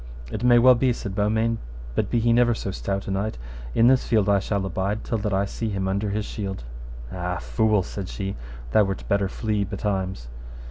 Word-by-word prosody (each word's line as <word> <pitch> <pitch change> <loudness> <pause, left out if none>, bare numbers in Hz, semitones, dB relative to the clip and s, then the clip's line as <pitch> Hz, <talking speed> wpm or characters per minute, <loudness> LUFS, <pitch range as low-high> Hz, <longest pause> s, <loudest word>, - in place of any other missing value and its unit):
It 105 - -4
may 120 -1 +6
well 125 +2 +8
be, 125 +1 +2
said 100 -4 -5
Beaumains, 110 +3 +1 0.3
but 100 - 0
be 120 - +2
he 115 +1 +3
never 120 0 +4
so 100 - -4
stout 100 +1 -3
a - - -2
knight, 100 -1 -2 0.4
in 115 - +5
this 130 +1 +5
field 105 -3 +3
I 100 -1 +4
shall 100 0 -1
abide 95 +3 -2
till 115 - -1
that 105 0 -2
I 95 +1 +2
see 110 +3 -3
him 95 -2 -2
under 100 +2 0
his 105 +1 -2
shield. 95 - -5 0.5
Ah, 90 0 -3
fool, 110 -3 +2
said 95 +1 -6
she, 95 -1 -4 0.4
thou 110 - +5
wert 95 0 -4
better 100 -1 +1
flee 105 0 -1
betimes. 95 - -3
100 Hz, 205 wpm, -24 LUFS, 95-110 Hz, 0.5 s, well